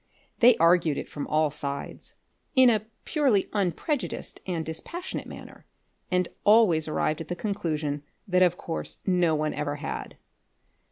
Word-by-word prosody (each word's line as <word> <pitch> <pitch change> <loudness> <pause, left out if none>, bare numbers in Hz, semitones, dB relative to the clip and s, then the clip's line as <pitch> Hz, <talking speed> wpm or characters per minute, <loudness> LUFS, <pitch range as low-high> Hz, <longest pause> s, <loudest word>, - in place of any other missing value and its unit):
They 245 0 +7
argued 165 -3 +4
it - - -4
from 145 - -6
all 155 -1 +2
sides, 140 -1 -5 0.4
in 260 -2 +7
a 215 -1 -1 0.2
purely 265 -11 +2
unprejudiced 210 - -2
and 170 -3 -2
dispassionate 335 - -5
manner, - - -11 0.4
and 180 -1 +1 0.2
always 205 -8 +5
arrived 155 0 0
at 160 - -7
the 175 - -3
conclusion 160 -8 -2 0.3
that 185 -1 +2
of 180 -1 +4
course 165 - -4
no 180 -4 +3
one 155 0 -1
ever 145 -1 -2
had. 145 - -6
175 Hz, 145 wpm, -27 LUFS, 155-205 Hz, 0.4 s, They